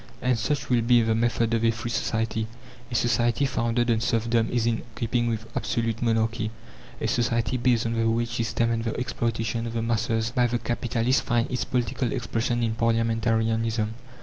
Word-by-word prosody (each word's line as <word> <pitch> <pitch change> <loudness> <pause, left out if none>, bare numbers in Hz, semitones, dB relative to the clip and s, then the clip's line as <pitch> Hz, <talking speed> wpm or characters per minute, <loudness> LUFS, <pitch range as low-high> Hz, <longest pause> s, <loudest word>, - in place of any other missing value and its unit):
And 125 -2 +1
such 145 +5 -1
will 120 -1 +4
be 120 0 +4
the 110 0 +2
method 115 0 +1
of 115 0 +1
a 115 - +5
free 115 +1 -3
society. 110 -1 -1 0.4
A - - -3
society 120 +2 +2
founded 120 -2 +1
on 115 - +2
serfdom 115 0 +1
is 120 -2 0
in 115 -1 +1
keeping 120 +1 0
with 110 -1 -2
absolute 115 -1 -1
monarchy; 115 -1 +1 0.5
a - - -1
society 115 0 +1
based 120 -2 +2
on 115 - -1
the 115 0 +1
wage 115 +1 0
system 115 0 0
and 115 0 -1
the 115 0 -2
exploitation 115 -2 -2
of 115 - -5
the 115 -1 -1
masses 115 0 0
by 125 0 +2
the 120 +1 0
capitalists 120 +1 0
finds 120 0 0
its 120 -2 -1
political 125 0 -1
expression 120 -1 -1
in 115 -1 +1
parliamentarianism. 115 -1 +1
115 Hz, 180 wpm, -26 LUFS, 115-120 Hz, 0.5 s, a